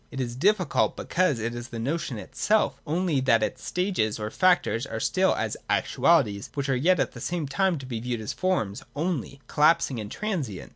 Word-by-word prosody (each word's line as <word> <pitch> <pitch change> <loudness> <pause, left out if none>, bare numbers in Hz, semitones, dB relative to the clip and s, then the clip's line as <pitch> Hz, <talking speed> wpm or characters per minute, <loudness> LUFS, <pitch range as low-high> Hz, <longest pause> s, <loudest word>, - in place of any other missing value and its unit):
It 135 - -7
is 120 -2 -3
difficult 185 +3 +2
because 180 -7 +1
it 115 +1 -3
is 120 0 -6
the 120 - -7
notion 135 +1 -2
itself, 170 - 0
only 165 -2 +1
that 115 -4 +3
its - - -3
stages 180 - -1
or 105 0 -4
factors 180 -10 +2
are - - -4
still - - +2
as - - -2
actualities, 110 -12 +2
which 140 -1 -2
are 135 - +3
yet 175 +9 +3
at - - 0
the - - -10
same 175 -4 -2
time 185 +4 +1
to 135 - -8
be 120 -3 -4
viewed 120 0 -3
as 110 - -4
forms 130 - -1
only, 145 -4 -3
collapsing 150 -4 +3
and 105 -1 -6
transient. 165 - -4
135 Hz, 195 wpm, -26 LUFS, 115-180 Hz, -, that